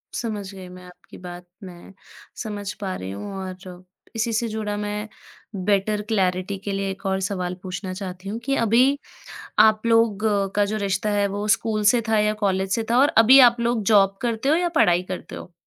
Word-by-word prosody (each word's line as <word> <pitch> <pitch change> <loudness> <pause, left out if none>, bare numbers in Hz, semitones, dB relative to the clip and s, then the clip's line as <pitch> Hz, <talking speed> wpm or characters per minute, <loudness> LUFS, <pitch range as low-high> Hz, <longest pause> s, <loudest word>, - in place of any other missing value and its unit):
समझ 205 -4 -4
गई 190 -2 -10
मैं 180 0 -12
आपकी 180 0 -15
बात। 180 0 -10 0.2
मैं 180 0 -12 0.5
समझ 205 -2 -5
पा 190 -2 -3
रही 95 +1 -6
हूँ 195 - -7
और 185 -1 -9 0.3
इसी 225 +1 -1
से 230 +2 0
जुड़ा 215 -1 -3
मैं 210 +1 -4 0.6
बेटर 205 +1 +1
क्लैरिटी 190 -2 0
के 200 - -2
लिए 195 0 -2
एक 195 +1 -10
और 190 0 0
सवाल 180 -2 -3
पूछना 185 0 -5
चाहती 185 0 -7
हूँ 225 - -4
कि 275 0 +1
अभी, 250 +5 +3 0.6
आप 215 +1 +5
लोगों 215 -3 +2
का 205 - +4
जो 210 +2 -3
रिश्ता 200 0 -1
है, 205 -1 +1
वो 205 +1 -4
स्कूल 215 -2 -3
से 240 - +3
था 220 -1 +3
या 210 0 +2
कॉलेज 190 -1 0
से 225 - 0
था? 240 - +3
और 280 - +5
अभी 245 +5 +8
आप 235 0 -10
लोग 235 -1 0
जॉब 195 -1 +4
करते 235 +2 -1
हो 305 - +5
या 350 0 +1
पढ़ाई 175 0 +4
करते 185 - -6
हो? 175 - -10
205 Hz, 200 wpm, -23 LUFS, 190-220 Hz, 0.6 s, अभी